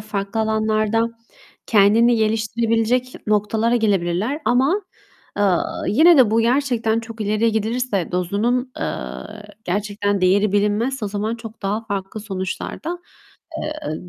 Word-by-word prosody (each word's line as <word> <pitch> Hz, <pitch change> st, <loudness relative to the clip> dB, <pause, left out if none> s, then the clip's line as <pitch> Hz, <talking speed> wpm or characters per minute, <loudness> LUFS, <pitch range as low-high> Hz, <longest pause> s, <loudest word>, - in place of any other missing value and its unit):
farklı 210 Hz, 0 st, -3 dB
alanlarda 220 Hz, 0 st, +1 dB, 0.7 s
kendini 225 Hz, +3 st, +4 dB
geliştirebilecek 225 Hz, +3 st, 0 dB
noktalara 215 Hz, +3 st, +1 dB
gelebilirler. 205 Hz, -, 0 dB
Ama, 270 Hz, +11 st, +2 dB, 0.6 s
eee, 205 Hz, -, +2 dB, 0.5 s
yine 320 Hz, -, +6 dB
de 245 Hz, -5 st, +6 dB
bu 225 Hz, +1 st, +3 dB
gerçekten 235 Hz, -2 st, +1 dB
çok 230 Hz, -1 st, -10 dB
ileriye 215 Hz, +2 st, +1 dB
gidilirse, 220 Hz, -4 st, -1 dB
dozunun, 225 Hz, +8 st, 0 dB
eee, -, -, 0 dB, 0.8 s
gerçekten 205 Hz, +1 st, -1 dB
değeri 195 Hz, +2 st, +3 dB
bilinmezse 210 Hz, +5 st, 0 dB
o -, -, -2 dB
zaman 210 Hz, +3 st, -2 dB
çok 225 Hz, -2 st, -11 dB
daha 210 Hz, +3 st, -2 dB
farklı 200 Hz, 0 st, -4 dB
sonuçlar 190 Hz, -3 st, -5 dB
da, 350 Hz, +2 st, -3 dB, 0.6 s
eee, 305 Hz, -, -5 dB
220 Hz, 120 wpm, -21 LUFS, 205-235 Hz, 0.8 s, yine